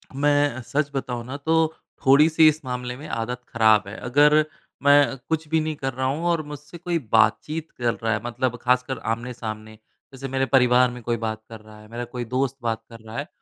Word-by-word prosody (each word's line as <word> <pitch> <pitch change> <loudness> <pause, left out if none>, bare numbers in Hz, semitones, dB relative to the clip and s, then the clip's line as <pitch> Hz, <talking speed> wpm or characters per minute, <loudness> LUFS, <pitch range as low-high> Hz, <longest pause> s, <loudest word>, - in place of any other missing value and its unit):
मैं 145 +1 +3
अ, 130 - -6
सच 145 +3 -1
बताऊँ 125 -3 -3
ना 130 +3 -6
तो 160 +3 +1 0.5
थोड़ी-सी 155 +4 +6
इस 155 +1 +2
मामले 125 -1 -4
में 155 +2 -9
आदत 120 +2 -3
ख़राब 110 -4 +4
है। 100 - -7
अगर 150 +3 +5 0.4
मैं 145 -1 +5
कुछ 160 -1 -1
भी 160 0 +2
नहीं 155 0 -2
कर 135 -2 -3
रहा 130 +1 -2
हूँ 145 +6 -1
और 165 -2 +1
मुझसे 150 +4 -10
कोई 175 0 -1 0.2
बातचीत 150 +9 +2
कर 120 -2 +1
रहा 115 -1 -1
है 105 - -2
मतलब 120 +1 -2
खासकर 125 +1 +1
आमने-सामने। 110 -2 -7 0.4
जैसे 135 +1 -6
मेरे 135 0 +2
परिवार 125 0 +5
में 125 0 -9
कोई 120 0 -1
बात 110 0 -3
कर 110 -1 -9
रहा 110 0 -15
है 105 - -15
मेरा 120 - -3
कोई 120 - -3
दोस्त 135 0 0
बात 115 -1 -1
कर 115 -1 -12
रहा 110 +3 -10
है 145 +3 -3
130 Hz, 210 wpm, -24 LUFS, 115-145 Hz, 0.5 s, थोड़ी-सी